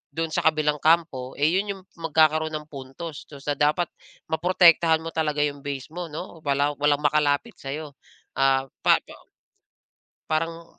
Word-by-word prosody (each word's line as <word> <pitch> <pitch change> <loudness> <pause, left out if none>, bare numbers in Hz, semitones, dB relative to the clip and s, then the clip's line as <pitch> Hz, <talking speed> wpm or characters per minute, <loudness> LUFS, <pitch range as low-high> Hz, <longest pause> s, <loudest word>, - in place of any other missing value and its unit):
do'n 165 -1 -2
sa - - +1
kabilang 150 -1 +1
kampo, 155 -6 +1
eh, 145 - -3 0.2
yon 205 0 -3
yong 190 - -15 0.2
magkakaroon 160 -1 +2
ng 150 0 -5
puntos. 140 +3 -8
Tas, 140 -2 -12
ah, 145 - +1
dapat 150 +3 +2 0.4
maprotektahan 165 -1 +4
mo 165 - -5
talaga 150 -2 0
'yong 145 -1 -2
base 140 +1 -6
mo, 175 0 -5
'no? 160 +2 -8
Wala 145 -1 +1
walang 145 0 +2
makalapit 150 +8 +2
sa'yo. 145 +2 -6 0.4
Ah, 135 -1 +2 0.2
pa - - +5
pa - - -13 1.2
parang 165 +1 -3
155 Hz, 155 wpm, -25 LUFS, 145-165 Hz, 1.2 s, pa